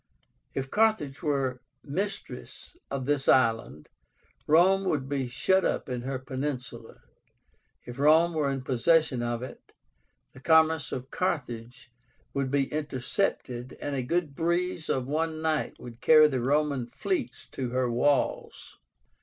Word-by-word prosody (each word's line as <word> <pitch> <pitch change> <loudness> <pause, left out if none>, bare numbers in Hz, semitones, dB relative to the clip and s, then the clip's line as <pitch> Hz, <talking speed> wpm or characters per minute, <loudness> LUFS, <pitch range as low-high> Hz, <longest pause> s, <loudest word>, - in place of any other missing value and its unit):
If 135 0 -3
Carthage 210 -11 +1
were 135 -5 -1 0.2
mistress 195 - -6
of 135 -2 -3
this 145 -1 0
island, 115 - +2 0.6
Rome 185 +5 +5
would 145 -7 -1
be 135 -2 -2
shut 190 +10 +2
up - - -1
in 125 -1 -3
her 130 +1 -3
peninsula; 130 0 -6 0.8
if 120 +2 -9
Rome 160 +4 +5
were 150 -3 0
in 135 -1 -3
possession 135 +1 +2
of 120 0 -2
it, 130 - -9 0.7
"the 135 - -13
commerce 160 +1 +3
of 130 +1 -6
Carthage 125 -7 -3 0.4
would 140 -1 -1
be 140 0 +2
intercepted, 130 -3 -2
and 145 -1 -3
a 130 - -1
good 160 +3 -1
breeze 170 +1 -1
of 130 -2 0
one 155 +3 -1
night 155 -1 -1
would 120 -1 -11
carry 155 -1 +7
the 130 -4 -2
Roman 140 -1 +1
fleets 265 - -3
to 130 -2 -3
her 125 +1 0
walls". 135 +4 -1
140 Hz, 135 wpm, -28 LUFS, 130-160 Hz, 0.8 s, carry